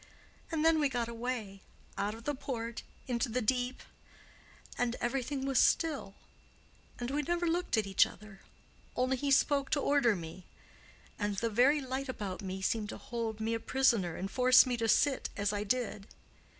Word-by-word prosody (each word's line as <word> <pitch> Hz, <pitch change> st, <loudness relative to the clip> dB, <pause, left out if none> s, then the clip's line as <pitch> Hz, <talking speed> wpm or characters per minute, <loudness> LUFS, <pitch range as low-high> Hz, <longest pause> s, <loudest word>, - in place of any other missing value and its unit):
And 320 Hz, -1 st, 0 dB
then 325 Hz, -1 st, +5 dB
we 290 Hz, -2 st, +2 dB
got 240 Hz, -3 st, -1 dB
away—out 220 Hz, -3 st, -5 dB
of 230 Hz, -, -12 dB
the 290 Hz, -, -1 dB
port—into 240 Hz, 0 st, -4 dB
the 245 Hz, +3 st, 0 dB
deep—and 245 Hz, 0 st, -4 dB
everything 265 Hz, +2 st, -2 dB
was 270 Hz, -2 st, +2 dB
still—and 255 Hz, -3 st, -3 dB
we 295 Hz, +2 st, 0 dB
never 345 Hz, +4 st, -1 dB
looked 345 Hz, -5 st, 0 dB
at 215 Hz, -, +2 dB
each 195 Hz, -1 st, +4 dB
other, 210 Hz, 0 st, -14 dB, 0.5 s
only 255 Hz, +1 st, +1 dB
he 280 Hz, +2 st, -2 dB
spoke 275 Hz, 0 st, +3 dB
to 295 Hz, -, +1 dB
order 280 Hz, -7 st, +3 dB
me—and 185 Hz, +4 st, -8 dB
the 230 Hz, +3 st, -1 dB
very 265 Hz, +7 st, +4 dB
light 265 Hz, +1 st, -4 dB
about 205 Hz, -6 st, -4 dB
me 190 Hz, -1 st, -5 dB
seemed 215 Hz, -1 st, 0 dB
to -, -, -6 dB
hold 230 Hz, -2 st, -4 dB
me 220 Hz, +1 st, -1 dB
a 230 Hz, -, -1 dB
prisoner 230 Hz, -10 st, +2 dB
and 195 Hz, +2 st, -5 dB
force 255 Hz, +1 st, +6 dB
me 250 Hz, -1 st, -1 dB
to 230 Hz, -1 st, 0 dB
sit 280 Hz, +3 st, +2 dB
as 205 Hz, 0 st, 0 dB
I 205 Hz, 0 st, -1 dB
did. 215 Hz, -2 st, -2 dB
245 Hz, 160 wpm, -32 LUFS, 210-270 Hz, 0.5 s, force